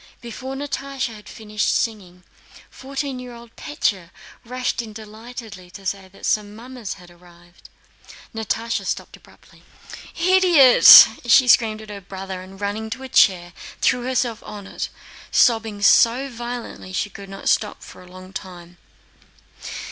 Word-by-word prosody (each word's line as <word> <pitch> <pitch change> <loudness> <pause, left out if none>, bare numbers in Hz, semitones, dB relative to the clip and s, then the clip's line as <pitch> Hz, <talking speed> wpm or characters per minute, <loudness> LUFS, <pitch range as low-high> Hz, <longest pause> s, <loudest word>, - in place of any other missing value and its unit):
Before 255 +3 -8
Natásha 275 -3 -4
had 210 -1 -13
finished 215 -1 -3
singing, 185 -6 -4 0.5
fourteen 275 0 -5
year 250 -1 -9
old 235 -1 -15
Pétya 200 - -3 0.3
rushed 250 0 -3
in 220 -2 -10
delightedly, 215 -3 -11
to 195 +2 -13
say 195 0 -4
that 190 - -12
some 210 -1 -1
mummers 240 -2 -8
had 180 -2 -16
arrived. 175 0 -20 0.6
Natásha 225 +1 -3
stopped - - -5
abruptly. - - -21 0.6
"Idiot!" 350 -7 +8 0.2
she 250 +2 +6
screamed 220 0 +3
at 215 - -14
her 200 -1 -8
brother 190 0 -8
and, 190 +1 -13
running 205 +2 -4
to 255 +4 -6
a 265 - -8
chair, 175 -6 +3 0.3
threw 250 - +2
herself 245 -2 -2
on 205 -2 -10
it, - - -5 0.4
sobbing 225 -4 +2
so 245 +6 +4
violently 240 -3 -7
that 185 - -7
she 205 - -2
could 195 +1 -11
not 195 0 -8
stop 210 -1 0
for - - -13
a 180 0 -16
long 185 +1 -13
time. 175 -2 -10
220 Hz, 150 wpm, -21 LUFS, 195-245 Hz, 0.6 s, Idiot